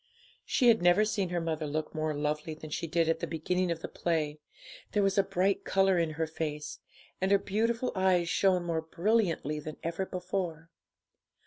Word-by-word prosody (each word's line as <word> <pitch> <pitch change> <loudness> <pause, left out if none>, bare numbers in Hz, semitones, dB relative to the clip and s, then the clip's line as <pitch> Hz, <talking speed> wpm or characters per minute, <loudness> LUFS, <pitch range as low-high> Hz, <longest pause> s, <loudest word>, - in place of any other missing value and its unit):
She 250 -4 +4
had 225 -4 +5
never 175 +4 +5
seen 205 -4 -1
her 175 0 -1
mother 160 -2 -2
look 155 +1 -3
more 155 -1 -1
lovely 150 +2 -2
than 155 0 -10
she 165 - -2
did 165 0 +1
at 165 0 +1
the - - -3
beginning 180 +3 -1
of 165 -1 -2
the - - -4
play; 155 -3 -1 0.5
there 205 - +3
was 195 -1 +2
a 195 - +5
bright 195 +1 0
colour 190 -2 +3
in 165 -2 0
her 160 - +1
face, 150 -2 -4 0.4
and 190 - +2
her 200 - +6
beautiful 230 +5 0
eyes 185 -2 +2
shone 185 0 +2
more 165 -2 -1
brilliantly 170 -3 0
than 155 0 -7
ever 170 +3 -2
before. 180 -3 -4
170 Hz, 190 wpm, -30 LUFS, 160-195 Hz, 0.5 s, her